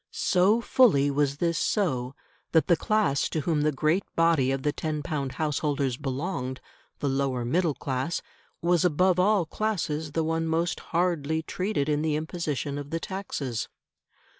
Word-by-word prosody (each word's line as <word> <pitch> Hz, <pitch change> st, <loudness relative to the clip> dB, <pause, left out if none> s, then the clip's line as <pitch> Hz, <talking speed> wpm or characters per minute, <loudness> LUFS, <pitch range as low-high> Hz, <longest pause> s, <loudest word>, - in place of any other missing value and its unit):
So 200 Hz, +5 st, +2 dB
fully 180 Hz, -, +4 dB
was 140 Hz, 0 st, +1 dB
this 170 Hz, +1 st, 0 dB
so, 135 Hz, -, 0 dB, 0.4 s
that 160 Hz, -, +5 dB
the 175 Hz, -, +4 dB
class 210 Hz, -6 st, +1 dB
to 155 Hz, -, -1 dB
whom 155 Hz, -1 st, 0 dB
the 155 Hz, +1 st, +2 dB
great 155 Hz, +7 st, +1 dB
body 165 Hz, -6 st, +3 dB
of 135 Hz, 0 st, -1 dB
the 150 Hz, -, +2 dB
ten 150 Hz, 0 st, -3 dB
pound 140 Hz, -4 st, -3 dB
householders 145 Hz, -4 st, -1 dB
belonged 130 Hz, 0 st, -3 dB, 0.4 s
the 145 Hz, -, 0 dB
lower 135 Hz, -3 st, 0 dB
middle 160 Hz, +3 st, +1 dB
class 135 Hz, +5 st, -2 dB, 0.4 s
was 175 Hz, -1 st, +3 dB
above 180 Hz, +2 st, +3 dB
all 195 Hz, -1 st, +3 dB
classes 160 Hz, -8 st, -2 dB
the 165 Hz, -, +1 dB
one 165 Hz, +1 st, -1 dB
most 165 Hz, +2 st, 0 dB
hardly 160 Hz, -3 st, 0 dB
treated 185 Hz, -4 st, -2 dB
in 150 Hz, -1 st, +1 dB
the 155 Hz, -1 st, 0 dB
imposition 150 Hz, -3 st, -3 dB
of 145 Hz, 0 st, -7 dB
the 165 Hz, +2 st, -2 dB
taxes. 160 Hz, -, -4 dB
155 Hz, 160 wpm, -27 LUFS, 140-175 Hz, 0.4 s, that